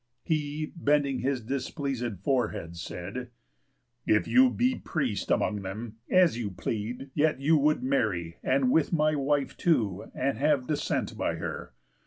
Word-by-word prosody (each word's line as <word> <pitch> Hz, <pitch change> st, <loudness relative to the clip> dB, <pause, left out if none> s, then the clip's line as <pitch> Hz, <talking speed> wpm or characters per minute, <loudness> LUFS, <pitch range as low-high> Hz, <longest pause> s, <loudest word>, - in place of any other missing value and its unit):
_ -, -, -50 dB, 0.2 s
He, 150 Hz, -1 st, -2 dB
bending 145 Hz, -4 st, +2 dB
his 130 Hz, -1 st, -1 dB
displeaséd 130 Hz, -, -3 dB
forehead, 110 Hz, -10 st, -1 dB
said: 90 Hz, +9 st, -6 dB, 0.8 s
"If 105 Hz, -, +3 dB
you 260 Hz, 0 st, +6 dB
be 250 Hz, +1 st, +1 dB
priest 130 Hz, -10 st, -2 dB
among 105 Hz, -2 st, +1 dB
them, 105 Hz, +4 st, -6 dB
as 180 Hz, -10 st, +4 dB
you 110 Hz, -4 st, -2 dB
plead, 110 Hz, +8 st, -4 dB
Yet 155 Hz, -2 st, +2 dB
you 150 Hz, +4 st, +4 dB
would 150 Hz, 0 st, +2 dB
marry, 105 Hz, -11 st, 0 dB
and 130 Hz, -1 st, +2 dB
with 160 Hz, +1 st, +3 dB
my 155 Hz, -2 st, +3 dB
wife 145 Hz, -1 st, 0 dB
too, 110 Hz, -, 0 dB
And 135 Hz, -4 st, -1 dB
have 145 Hz, -3 st, +2 dB
descent 150 Hz, +2 st, -1 dB
by -, -, 0 dB
her. 60 Hz, -, -6 dB
135 Hz, 150 wpm, -28 LUFS, 110-150 Hz, 0.8 s, you